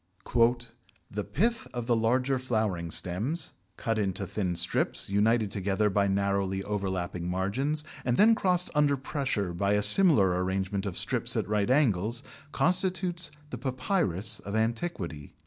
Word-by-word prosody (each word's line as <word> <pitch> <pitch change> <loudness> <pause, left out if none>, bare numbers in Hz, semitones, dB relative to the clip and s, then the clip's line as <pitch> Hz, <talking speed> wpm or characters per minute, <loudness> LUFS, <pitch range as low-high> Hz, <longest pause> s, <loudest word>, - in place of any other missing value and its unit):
"The 105 0 -3
pith 230 - 0
of 120 -1 -3
the 120 -1 +2
larger 125 +4 +1
flowering 110 -9 -1
stems... 110 - -1 0.2
cut 115 -1 -1
into 100 -1 -1
thin 90 -2 -2
strips, 90 - +1
united 105 +1 +2
together 100 +2 0
by 100 +1 +2
narrowly 100 -1 0
overlapping 95 -4 -3
margins, 125 +12 -1 0.2
and 120 -1 0
then 225 +2 +6
crossed 180 -4 +2
under 145 -2 +3
pressure 130 - -2
by 100 +3 +1
a 105 0 +2
similar 100 - +4
arrangement 95 +1 -2
of 95 - -4
strips - - -1
at - - -1
right 105 +1 0
angles, 120 -3 +2 0.3
constitutes 180 -1 0 0.2
the - - -5
Papyrus 130 - -1
of 100 +1 -6
antiquity." 110 - -3
105 Hz, 140 wpm, -28 LUFS, 95-135 Hz, 0.3 s, then